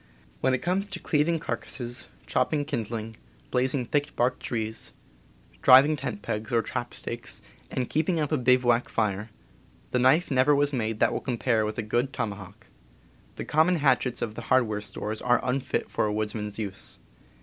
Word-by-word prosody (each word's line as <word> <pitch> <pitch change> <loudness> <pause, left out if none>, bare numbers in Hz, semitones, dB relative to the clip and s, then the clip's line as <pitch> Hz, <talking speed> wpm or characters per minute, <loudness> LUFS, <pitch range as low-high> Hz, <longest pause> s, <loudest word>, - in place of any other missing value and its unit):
When 130 -1 +2
it - - -5
comes 185 +3 0
to - - -5
cleaving 160 +2 +1
carcasses, 120 -5 -4 0.2
chopping 145 -2 +1
kin 140 - -1
dling, 110 0 -6 0.3
blazing 130 0 +1
thick 145 +4 -1
barked 125 +1 +1
trees, 110 -2 -3 0.7
driving 140 +4 +7
tent 125 -7 -5
pegs 110 +1 -3
or 115 -1 +2
trap 120 - -4
stakes, 120 0 -3 0.3
and 125 -2 -2
keeping 160 +2 0
up 150 -1 -1
a 155 - +3
bivouac 125 -1 +3
fire, 105 -1 -1 0.6
the 125 - +2
knife 135 +8 +4
never 130 +2 +4
was 145 0 +2
made 110 -3 -1
that - - +4
will - - -2
compare 115 -3 0
with 110 - -5
a 120 - -1
good 120 +5 0
toma 105 -5 -2
hawk. 105 +3 -13 0.7
The - - -5
common 160 +4 +3
hatchets 135 -5 +1
of 110 -2 -3
the 120 - -7
hardware 110 -5 +3
stores 105 +1 -4
are 120 0 +3
unfit 130 +1 -1
for - - 0
a - - -1
woodsman's 105 -1 -3
use. 100 -3 -6
125 Hz, 175 wpm, -27 LUFS, 110-140 Hz, 0.7 s, driving